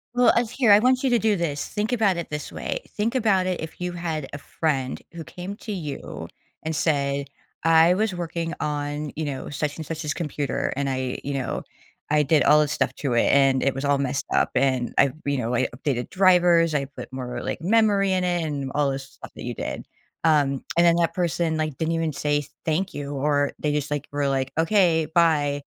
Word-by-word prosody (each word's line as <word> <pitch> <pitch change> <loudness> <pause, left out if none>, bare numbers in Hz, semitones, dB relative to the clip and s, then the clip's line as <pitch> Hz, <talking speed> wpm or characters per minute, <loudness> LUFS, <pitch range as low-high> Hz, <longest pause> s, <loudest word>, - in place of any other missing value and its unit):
Well, 245 0 +5
uh, 240 0 +3
here, 240 -2 +2
I 205 - +8
want 255 +2 +2
you 265 - +3
to 240 - +4
do 215 -2 +2
this, 155 -5 -2
think 210 +3 -2
about 210 -7 +2
it 170 - -4
this 150 0 -5
way, - - -3 0.2
think 220 +4 0
about 205 -6 +2
it 185 -3 -2
if 160 - -8
you 180 0 -2
had 165 -5 -4
a - - -4
friend 140 -4 -2
who 165 -1 -7
came 180 +5 -7
to 215 - -7
you 150 -8 -6 0.4
and 160 0 -2
said, 140 -3 0 0.4
"I 165 +1 +6
was 205 -1 0
working 170 -1 -3
on, 145 0 -3
you 155 - -3
know, 140 -2 -4
such 145 +1 -3
and 160 - -6
such's 155 -1 -3
computer 150 -4 -2
and 140 0 -1
I, 130 -1 -2
you 140 - -3
know 135 -3 -2 0.5
I 150 0 +3
did 150 +1 +3
all 150 +1 +6
this 150 -1 0
stuff - - 0
to 135 -4 -2
it 120 - +3
and 135 -2 +4
it 135 - +1
was 135 - -4
all 140 0 +2
messed 135 0 -2
up - - +2
and 130 -2 +1
I 140 -2 +5
you 140 -1 0
know 120 0 -2
I 120 - +2
updated 130 -2 -2
drivers, 175 -3 +4
I 140 -2 0
put 135 -1 -10
more, 125 -2 -5
like, - - -4
memory 200 0 +3
in 185 -1 +1
it" 175 -2 0
and 140 -3 -3
all 145 -1 +2
this 135 0 -4
stuff 135 - -13
that - - -8
you - - -3
did, - - -5 0.4
um, 145 -4 +2
and 170 - +6
then 170 0 +5
that 170 -1 +1
person, 170 -2 0
like, 155 -3 -2
didn't 165 +1 -1
even 165 -2 -1
say, 145 0 0 0.2
"thank 175 +5 0
you," 145 0 -5
or 145 +1 +1
they 150 - 0
just, 145 0 -2
like, 145 -2 -2
were, 145 -1 0
like, 135 -1 -1
"Okay, 165 -2 +3
bye." 145 -4 +3
155 Hz, 220 wpm, -24 LUFS, 140-175 Hz, 0.5 s, I